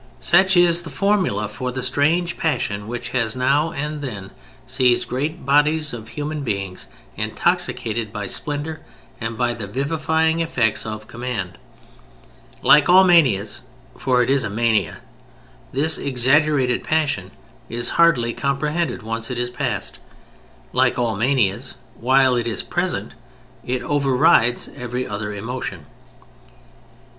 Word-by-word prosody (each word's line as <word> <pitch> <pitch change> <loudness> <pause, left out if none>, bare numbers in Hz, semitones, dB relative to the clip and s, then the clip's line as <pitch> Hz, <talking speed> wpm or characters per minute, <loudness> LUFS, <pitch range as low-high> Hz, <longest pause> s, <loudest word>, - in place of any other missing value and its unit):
Such 190 +2 +4
is 175 -1 +5
the 165 - -8
formula 185 - 0
for 125 +5 -5
the 130 0 -4
strange 155 +7 +1
passion 105 - -2
which 120 +1 -5
has 115 -3 -1
now 140 +5 +1
and 150 -1 -4
then 100 -8 -6 0.3
seized 125 -1 +2
great 150 +5 -3
bodies 150 +1 +2
of 110 -2 -7
human 150 +3 -5
beings 100 -6 -4 0.3
intoxicated 110 -1 -1
by 105 -2 -5
splendor 150 +8 -3 0.4
and 115 0 -4
by 120 0 0
the 115 -3 -6
vivifying 160 +6 0
effects 125 -10 0
of 110 0 -6
command. 115 -7 -5 1.0
Like 150 +2 +6
all 185 +2 +8
manias 130 - +3 0.3
(for 125 -1 +2
it 125 - 0
is 135 -1 +2
a 110 - -2
mania) 110 -1 0 0.7
this 150 +4 +1
exaggerated 135 0 +2
passion 155 -2 0 0.4
is 120 +1 -2
hardly 125 -9 +4
comprehended 145 0 -2
once 115 +1 -3
it 125 - -4
is 120 0 -1
past. 125 - -3 0.7
Like - - +2
all 120 -3 0
manias, 115 -3 0 0.2
while 130 +1 +3
it 120 -1 -1
is 115 - -2
present - - -2 0.5
it 125 0 -2
overrides 130 -4 +3
every 125 -1 -4
other 105 0 -4
emotion. 105 - -5
130 Hz, 130 wpm, -21 LUFS, 115-150 Hz, 1.0 s, all